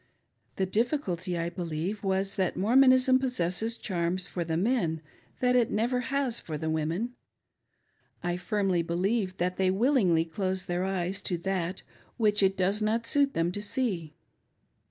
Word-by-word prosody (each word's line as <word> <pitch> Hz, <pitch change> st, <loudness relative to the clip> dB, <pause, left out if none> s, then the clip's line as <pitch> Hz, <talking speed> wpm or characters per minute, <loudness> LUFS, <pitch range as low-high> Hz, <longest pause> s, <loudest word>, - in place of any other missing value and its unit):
The 190 Hz, -, 0 dB
difficulty, 190 Hz, -, -1 dB
I 170 Hz, 0 st, -2 dB
believe, 175 Hz, +3 st, -4 dB
was 195 Hz, 0 st, 0 dB
that 190 Hz, -2 st, 0 dB
Mormonism 255 Hz, +5 st, +5 dB
possesses 225 Hz, -3 st, -1 dB
charms 180 Hz, -1 st, -1 dB
for 175 Hz, -, -3 dB
the 160 Hz, -1 st, -2 dB
men 180 Hz, -6 st, +1 dB, 0.4 s
that 250 Hz, 0 st, +3 dB
it 240 Hz, -3 st, +3 dB
never 240 Hz, +4 st, 0 dB
has 270 Hz, -4 st, 0 dB
for 155 Hz, -2 st, -5 dB
the 160 Hz, +1 st, -2 dB
women. 165 Hz, +9 st, -1 dB, 1.1 s
I 175 Hz, 0 st, 0 dB
firmly 190 Hz, -1 st, 0 dB
believe 185 Hz, +3 st, -1 dB
that 180 Hz, +1 st, -1 dB
they 190 Hz, -1 st, +2 dB
willingly 190 Hz, -, +3 dB
close 185 Hz, +2 st, -2 dB
their 175 Hz, +1 st, -1 dB
eyes 190 Hz, +1 st, -2 dB
to 180 Hz, -, -1 dB
that 185 Hz, 0 st, -3 dB, 0.3 s
which 210 Hz, -3 st, +3 dB
it 195 Hz, 0 st, +3 dB
does 195 Hz, +3 st, +1 dB
not 225 Hz, +2 st, 0 dB
suit 280 Hz, +3 st, +2 dB
them 165 Hz, +1 st, +1 dB
to 205 Hz, -, -5 dB
see. 195 Hz, -, -2 dB
190 Hz, 155 wpm, -28 LUFS, 175-230 Hz, 1.1 s, Mormonism